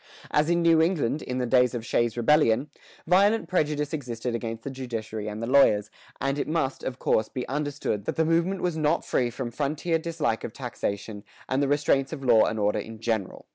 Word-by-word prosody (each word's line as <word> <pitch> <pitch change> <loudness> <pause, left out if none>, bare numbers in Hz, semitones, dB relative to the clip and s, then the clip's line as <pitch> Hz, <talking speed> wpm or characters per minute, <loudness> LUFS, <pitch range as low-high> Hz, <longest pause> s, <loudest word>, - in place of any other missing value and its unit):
[119:1] - - +4
As 150 +2 +1
in 170 0 +2
New 165 -1 +5
England, 160 -5 +1
in 125 - -4
the 125 - 0
days 125 0 +3
of 115 -1 -4
Shays' 120 0 0
Rebellion, 140 +1 +3 0.3
violent 200 +6 +3
prejudice 150 -4 0
existed 125 -5 -4
against 115 -1 -4
the 140 - -5
judiciary 115 -5 -5
and 105 +2 -5
the - - 0
lawyers, 110 -5 +4 0.3
and 135 +1 -1
it - - -2
must, 155 -4 -1
of 130 -1 -4
course, 110 -3 +1
be 125 - -5
understood 145 -7 -2
that - - -2
the 160 - +2
movement 170 +4 +1
was 175 -2 0
not 155 -1 +1
free 125 -2 +1
from 120 0 -5
frontier 150 +5 -1
dislike 160 -8 -2
of 110 - -5
taxation 110 -5 -5 0.2
and 130 +2 0
the 140 - +2
restraints 140 -1 +1
of 150 -4 -6
law 115 -3 +6
and 110 - -2
order 105 0 +1
in 110 0 -8
general. 110 -4 -3
135 Hz, 210 wpm, -26 LUFS, 115-155 Hz, 0.3 s, law